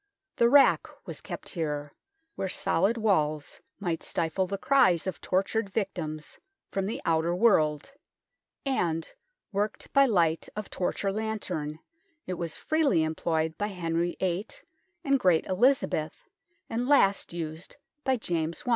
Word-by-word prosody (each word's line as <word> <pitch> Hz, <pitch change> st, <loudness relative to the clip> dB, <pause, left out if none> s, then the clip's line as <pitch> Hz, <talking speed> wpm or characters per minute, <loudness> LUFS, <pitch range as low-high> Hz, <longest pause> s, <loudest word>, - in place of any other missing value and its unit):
The 235 Hz, -, +5 dB
rack 285 Hz, +2 st, +6 dB, 0.2 s
was -, -, -7 dB
kept -, -, -7 dB
here, 150 Hz, -4 st, -3 dB, 0.4 s
where 190 Hz, -, -3 dB
solid 195 Hz, +6 st, +1 dB
walls 155 Hz, -9 st, 0 dB, 0.2 s
might 175 Hz, -5 st, -2 dB
stifle 170 Hz, +3 st, -1 dB
the 200 Hz, +2 st, -3 dB
cries 245 Hz, -, +4 dB
of 190 Hz, -, -4 dB
tortured 195 Hz, +3 st, 0 dB
victims 170 Hz, -7 st, -4 dB, 0.3 s
from 195 Hz, -1 st, -1 dB
the 220 Hz, -, -4 dB
outer 165 Hz, +1 st, +2 dB
world, 170 Hz, -, +3 dB, 0.7 s
and, 165 Hz, -12 st, 0 dB, 0.4 s
worked 205 Hz, +1 st, -3 dB
by 275 Hz, -1 st, +6 dB
light 170 Hz, -7 st, +2 dB
of 210 Hz, -1 st, -6 dB
torch 185 Hz, +2 st, -2 dB
or 195 Hz, -, +2 dB
lantern, 195 Hz, -8 st, -3 dB, 0.5 s
it 185 Hz, -, -3 dB
was 170 Hz, -2 st, -4 dB
freely 305 Hz, -, +2 dB
employed 160 Hz, 0 st, -1 dB
by 205 Hz, -, 0 dB
Henry 175 Hz, -3 st, -2 dB
VIII 185 Hz, +2 st, -1 dB, 0.6 s
and 275 Hz, -3 st, +3 dB
great 180 Hz, -7 st, +3 dB
Elizabeth, 190 Hz, -, +2 dB, 0.5 s
and 240 Hz, +2 st, -2 dB
last 200 Hz, -9 st, +4 dB
used 165 Hz, 0 st, -6 dB, 0.3 s
by 265 Hz, -1 st, +2 dB
James 165 Hz, -6 st, -2 dB
I. -, -, -2 dB
185 Hz, 140 wpm, -28 LUFS, 160-220 Hz, 0.7 s, rack